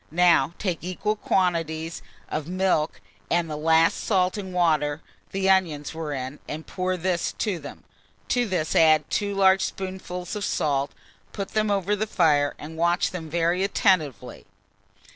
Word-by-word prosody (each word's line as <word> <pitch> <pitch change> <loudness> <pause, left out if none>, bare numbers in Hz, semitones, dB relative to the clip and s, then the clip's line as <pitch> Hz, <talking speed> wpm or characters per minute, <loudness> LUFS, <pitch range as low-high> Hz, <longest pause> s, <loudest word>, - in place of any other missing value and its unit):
Now 170 -3 +4
take 185 -4 -2
equal 185 +4 -2
quantities 165 -5 -1 0.3
of 155 - -4
milk 180 - 0 0.3
and 170 0 +1
the 155 - -4
last 160 +2 +3
salt 185 -3 +2
and 195 -3 -5
water 155 -4 +1 0.3
the 190 0 -1
onions 170 -7 +2
were 160 -2 -4
in, 135 +1 -5
and 155 +1 -6
pour 185 0 -2
this 175 0 -1
to 200 -6 -2
them; 145 -1 -10 0.5
to 245 -1 +2
this 175 -5 -1
add 155 -2 +5
2 200 -1 -1
large 190 -1 +5
spoonfuls 185 -1 -5
of 210 - -3
salt, 140 -5 0 0.4
put 200 -2 -4
them 215 -1 0
over 200 0 +1
the 215 +2 -2
fire, 150 -7 +2
and 160 +2 -9
watch 170 +2 +2
them 165 -4 -6
very 170 +3 +1
attentively. 180 - 0
175 Hz, 155 wpm, -25 LUFS, 155-190 Hz, 0.5 s, add